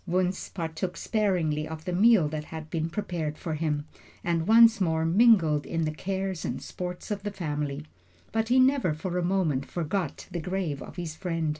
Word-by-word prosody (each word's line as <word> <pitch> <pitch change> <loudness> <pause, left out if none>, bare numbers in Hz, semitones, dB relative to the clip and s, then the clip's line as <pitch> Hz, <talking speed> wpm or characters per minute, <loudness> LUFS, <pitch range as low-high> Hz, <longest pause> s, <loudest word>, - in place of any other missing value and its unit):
Wunzh 185 +1 0
partook 170 +1 -3
sparingly 175 -8 0
of 160 0 -8
the 180 - -2
meal 205 -3 +5
that 150 0 -4
had 160 -1 -8
been 165 0 -1
prepared 170 -5 -3
for 165 - -4
him, 150 -2 -1 0.4
and 170 -1 0
once 225 -1 +7
more 160 -2 +1
mingled 170 -6 +5
in 165 -1 -1
the 155 - -1
cares 190 0 -3
and - - -3
sports 180 +2 -6
of 205 -1 -2
the 205 - -3
family. 150 -6 -3 0.5
But 225 +1 0
he 250 +2 +4
never 255 - +3
for 180 +3 -2
a - - -1
moment 170 -7 +1
forgot 175 -1 -3
the 175 - -3
grave 180 -5 -2
of - - -9
his 170 -4 -5
friend. 165 -2 -2
170 Hz, 185 wpm, -27 LUFS, 155-195 Hz, 0.5 s, once